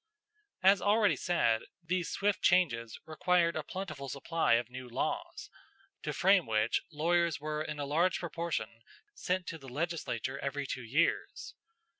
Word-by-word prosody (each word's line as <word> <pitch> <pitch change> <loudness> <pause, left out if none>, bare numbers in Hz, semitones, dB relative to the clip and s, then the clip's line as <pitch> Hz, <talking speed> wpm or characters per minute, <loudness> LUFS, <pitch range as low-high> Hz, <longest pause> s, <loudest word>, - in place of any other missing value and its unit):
As 195 0 +6
already 205 0 +4
said, 120 -11 +1 0.2
these 180 +1 -1
swift 200 -1 0
changes 120 -12 +2
required 170 +2 +2
a 155 - -1
plentiful 155 -4 -6
supply 145 +1 +1
of 115 0 +2
new 130 -1 -8
laws, 120 - -3 0.5
to - - -3
frame 190 -5 +4
which 110 +1 +1
lawyers 170 +1 +1
were 150 +1 -3
in 150 -1 -4
a 145 - -2
large 165 +5 +2
proportion 160 -10 -4 0.3
sent 180 - -2
to 165 - -6
the 135 -2 -11
legislature 140 -3 -3
every 140 +1 -3
two 130 - -4
years. 145 +9 0
155 Hz, 145 wpm, -32 LUFS, 130-175 Hz, 0.5 s, As